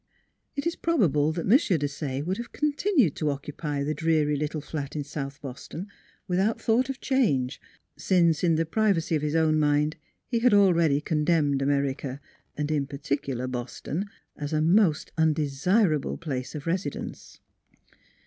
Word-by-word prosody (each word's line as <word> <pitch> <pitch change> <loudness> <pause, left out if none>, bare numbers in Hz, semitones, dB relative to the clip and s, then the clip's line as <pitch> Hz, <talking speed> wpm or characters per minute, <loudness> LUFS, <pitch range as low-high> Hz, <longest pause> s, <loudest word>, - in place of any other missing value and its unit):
It 280 - -3
is 335 - 0
probable 160 - +2
that 170 - -3
M. - - -2
Desaye 145 - +1
would 185 +3 -1
have 235 - -7
con 300 0 0
tinued 285 - +2
to 155 - 0
occupy 145 +1 -3
the 150 +2 -1
dreary 155 -1 +1
little 150 +2 -2
flat 145 -1 -5
in 150 - -2
South 140 -1 -6
Boston 140 +6 -7 0.4
without 190 +4 +1
thought 240 +4 +2
of 270 - -4
change, 150 - +1 0.4
since 170 -4 +2
in 165 -2 +4
the 165 +1 +1
privacy 185 -2 +1
of 150 - 0
his 150 +1 -1
own 155 -1 +3
mind 150 +1 +2 0.3
he 235 - -1
had 235 -2 +4
already 170 -7 +4
con 150 0 0
demned 150 -4 +2
America 140 -1 -1 0.4
and 150 +1 -1
in 145 -3 0
particular 140 -2 -3
Boston 130 - -4 0.3
as 145 +1 -5
a 155 - +2
most 165 0 +3
undesirable 155 +3 +2
place 135 -6 -4
of 145 - -6
residence. 180 +3 -4
155 Hz, 160 wpm, -26 LUFS, 145-185 Hz, 0.4 s, in